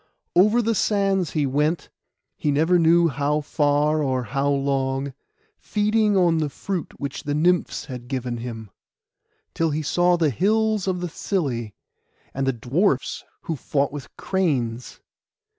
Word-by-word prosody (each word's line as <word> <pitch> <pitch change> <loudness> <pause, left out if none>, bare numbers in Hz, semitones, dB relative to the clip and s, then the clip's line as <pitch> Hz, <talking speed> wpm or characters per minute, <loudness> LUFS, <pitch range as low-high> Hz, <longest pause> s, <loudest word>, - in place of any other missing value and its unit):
Over 210 +7 +5
the 230 +1 +1
sands 195 -4 +1
he 150 -3 +1
went,—he 150 +1 -3
never 160 +5 +3
knew 170 +1 +5
how 145 +2 0
far 150 +1 +1
or 130 -3 0
how 140 +3 -1
long, 135 -1 0 0.5
feeding 210 -1 +1
on 170 -3 +3
the 155 -2 0
fruit 180 +5 -5
which 140 -1 -4
the 145 0 -2
Nymphs 175 +3 +1
had 125 -3 -8
given 125 -2 -3
him, 115 -3 -7 0.8
till 165 -1 +1
he 155 +1 -2
saw 175 +3 +3
the 160 -4 +2
hills 215 - +1
of 180 -2 -1
the 180 - -2
Psylli, 135 - -2 0.6
and 135 0 -2
the - - +4
Dwarfs 135 - 0 0.2
who 165 - -3
fought 140 +1 -1
with 145 -2 -7
cranes. 130 -11 -1
150 Hz, 140 wpm, -23 LUFS, 135-180 Hz, 0.8 s, Over